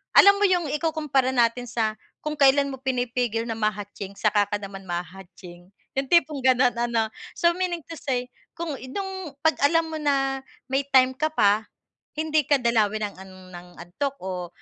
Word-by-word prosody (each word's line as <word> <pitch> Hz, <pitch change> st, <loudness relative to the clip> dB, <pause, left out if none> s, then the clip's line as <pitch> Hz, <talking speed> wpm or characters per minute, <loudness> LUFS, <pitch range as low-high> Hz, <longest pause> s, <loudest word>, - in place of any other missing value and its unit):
alam 400 Hz, 0 st, +9 dB
mo -, -, +1 dB
yung 355 Hz, -4 st, +1 dB
ikukumpara 300 Hz, -4 st, 0 dB
natin 240 Hz, +1 st, +2 dB
sa 220 Hz, -2 st, -1 dB, 0.3 s
kung 305 Hz, 0 st, -3 dB
kailan 280 Hz, 0 st, +5 dB
mo 265 Hz, -, -5 dB
pinipigil 245 Hz, -3 st, -1 dB
na 225 Hz, -, -2 dB
ma-hatsing 205 Hz, -2 st, -3 dB
saka 210 Hz, -1 st, +3 dB
ka 205 Hz, -, -1 dB
naman 195 Hz, -1 st, -8 dB
maha-hatsing. 175 Hz, 0 st, -8 dB, 0.3 s
Yung 270 Hz, -, +1 dB
tipong 305 Hz, -4 st, +4 dB
ganon 255 Hz, -1 st, +4 dB
ano. 235 Hz, -2 st, +1 dB, 0.3 s
So 340 Hz, -1 st, +3 dB
meaning 360 Hz, -2 st, -2 dB
to 330 Hz, -, -6 dB
say, 250 Hz, -3 st, -2 dB, 0.2 s
kung 330 Hz, -4 st, -4 dB
i -, -, -10 dB
nung 380 Hz, -4 st, -5 dB
‘pag 320 Hz, 0 st, +3 dB
alam 330 Hz, +2 st, +3 dB
mo 315 Hz, -, -5 dB
na 270 Hz, -2 st, 0 dB, 0.3 s
may 270 Hz, +1 st, +1 dB
time 260 Hz, -1 st, +5 dB
ka 310 Hz, +1 st, 0 dB
pa, 210 Hz, -3 st, +3 dB, 0.5 s
hindi 310 Hz, 0 st, +2 dB
ka 290 Hz, -, +5 dB
dalawin 215 Hz, -3 st, +1 dB
ng -, -, -16 dB
ang 190 Hz, 0 st, -12 dB, 0.2 s
ng 175 Hz, 0 st, -10 dB
antok 275 Hz, +11 st, -4 dB
o 180 Hz, -2 st, -5 dB
255 Hz, 175 wpm, -25 LUFS, 210-300 Hz, 0.5 s, alam